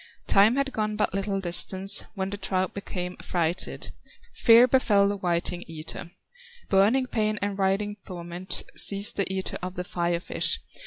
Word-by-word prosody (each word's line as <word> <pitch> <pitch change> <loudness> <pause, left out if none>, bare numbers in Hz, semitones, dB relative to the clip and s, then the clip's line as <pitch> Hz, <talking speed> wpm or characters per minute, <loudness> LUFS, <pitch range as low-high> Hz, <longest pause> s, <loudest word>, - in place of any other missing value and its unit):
Time 205 +5 +4
had 275 0 -1
gone 215 -1 -2
but 210 - 0
little 195 0 -2
distance, 190 +2 +2
When 190 -1 -3
the - - -3
trout 190 -1 -2
became 180 -2 -5
affrighted, 175 0 -3 0.4
Fear 235 - +6
befel 210 -6 +3
the 205 - -1
whiting 175 -1 -1
eater; 165 +1 -7 0.6
Burning 210 +7 +3
pain 215 -3 -1
and 200 0 -2
writhing 200 +2 -1
torment 175 0 -3
Seized 200 +1 +4
the 200 -1 0
eater 190 0 -3
of 185 0 -6
the 180 - -4
Fire 175 -1 -1
fish. - - -1
195 Hz, 155 wpm, -26 LUFS, 180-205 Hz, 0.6 s, Fear